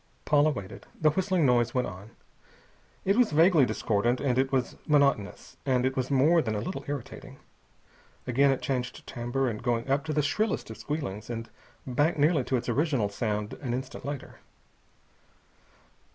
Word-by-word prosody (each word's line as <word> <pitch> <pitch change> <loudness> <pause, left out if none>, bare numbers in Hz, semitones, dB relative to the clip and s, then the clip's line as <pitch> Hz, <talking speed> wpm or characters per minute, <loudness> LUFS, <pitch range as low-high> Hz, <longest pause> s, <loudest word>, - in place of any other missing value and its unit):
Paula 150 0 +4
waited. 100 -10 -7
The 155 -1 +4
whistling 185 -1 +1
noise 120 -2 +2
went 125 - +2
on. 95 +4 -9 1.0
It 195 +3 +3
was 245 -3 +4
vaguely 160 -3 +5
discordant, 115 +3 0
and 130 -3 +1
it 135 0 +1
was 130 -2 0
monotonous, 140 -9 +1
and 130 -2 +1
it 130 0 0
was 130 -1 -1
more 150 +5 +4
than 110 -6 -2
a - - -1
little 185 - -5
irritating. 140 -4 -6 0.9
Again 140 +3 +3
it 135 - 0
changed 125 -2 -3
timbre, 120 +1 -2
going 120 +2 -2
up 140 +1 +1
to 155 - -2
the 150 0 +1
shrillest 210 - -1
of 110 - -8
squealings, 120 -9 -4
and 115 -1 -5 0.3
back 145 +6 +1
nearly 150 -1 +3
to 130 - +1
its 120 - -5
original 125 -4 +1
sound 105 0 -2
an 125 -4 -2
instant 130 +1 -6
later. 140 0 -6
130 Hz, 165 wpm, -28 LUFS, 120-150 Hz, 1.0 s, vaguely